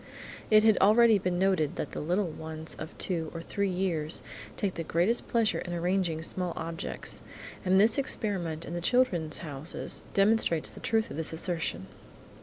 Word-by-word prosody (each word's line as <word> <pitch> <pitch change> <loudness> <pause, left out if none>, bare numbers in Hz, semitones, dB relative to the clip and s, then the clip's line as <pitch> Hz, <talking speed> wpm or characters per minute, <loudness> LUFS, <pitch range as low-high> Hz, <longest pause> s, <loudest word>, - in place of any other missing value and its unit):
It 215 0 +6
had 220 -2 +5
already 220 +1 +6
been 180 -1 -1
noted 180 -4 +1
that - - -5
little 180 +6 0
ones 160 0 -7
of 155 - -8
two 165 -4 -2
or - - -3
three 200 +2 -1
years 175 -4 -1 0.3
take 195 -3 -1
the 165 - -4
greatest 175 +9 +1
pleasure 230 -3 +1
in 175 - -5
arranging 175 -2 0
small 180 0 -2
objects, 165 +1 -4 0.4
and 190 0 +4
this 220 +6 +4
experiment 180 - -1
in - - -6
the 175 - -3
"Children's 175 - +2
Houses" 150 0 -4
demonstrates 195 -5 +3
the - - -11
truth 225 -1 0
of - - -6
this 160 0 0
assertion. 160 - -2
180 Hz, 165 wpm, -29 LUFS, 160-205 Hz, 0.4 s, It